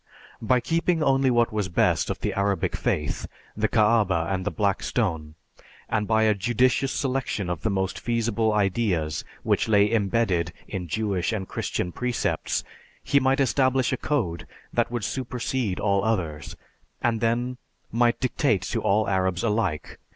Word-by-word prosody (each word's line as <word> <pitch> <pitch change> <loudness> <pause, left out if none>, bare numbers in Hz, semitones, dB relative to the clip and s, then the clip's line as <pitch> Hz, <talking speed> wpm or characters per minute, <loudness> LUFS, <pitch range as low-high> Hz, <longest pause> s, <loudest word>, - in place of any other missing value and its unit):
By 125 +3 +3
keeping 165 +1 +1
only 135 -1 +3
what 120 -2 +2
was 105 -3 -1
best 85 - +2
of - - -3
the - - -1
Arabic 100 0 0
faith, 75 -1 -2 0.3
the 110 +1 +1
Kaaba 105 -6 +3
and 95 -1 -1
the - - +1
Black 100 -3 0
Stone, 80 -10 -2 0.5
and 105 -2 -1
by 110 0 +3
a 110 -1 +4
judicious 120 +6 +1
selection 130 -9 -2
of 85 -2 -4
the 110 - 0
most 95 -2 -1
feasible 115 -2 0
ideas 95 -7 0 0.2
which 115 - +1
lay 105 0 +4
imbedded 100 -6 +1
in 90 -4 -5
Jewish 100 0 -1
and 100 -4 -3
Christian 90 - -3
precepts, 110 -7 -1 0.4
he 140 - +3
might 135 +1 +2
establish 130 -1 +2
a - - +2
code 110 - -2 0.3
that - - +1
would 120 -2 -3
supersede 125 -3 -2
all 100 -1 +1
others, 85 - -2 0.5
and 115 -2 +1
then 120 +2 0 0.3
might 120 0 +2
dictate 125 -6 +1
to - - -2
all 105 +1 +2
Arabs 95 -1 0
alike. 105 -8 -1
110 Hz, 155 wpm, -25 LUFS, 95-120 Hz, 0.5 s, a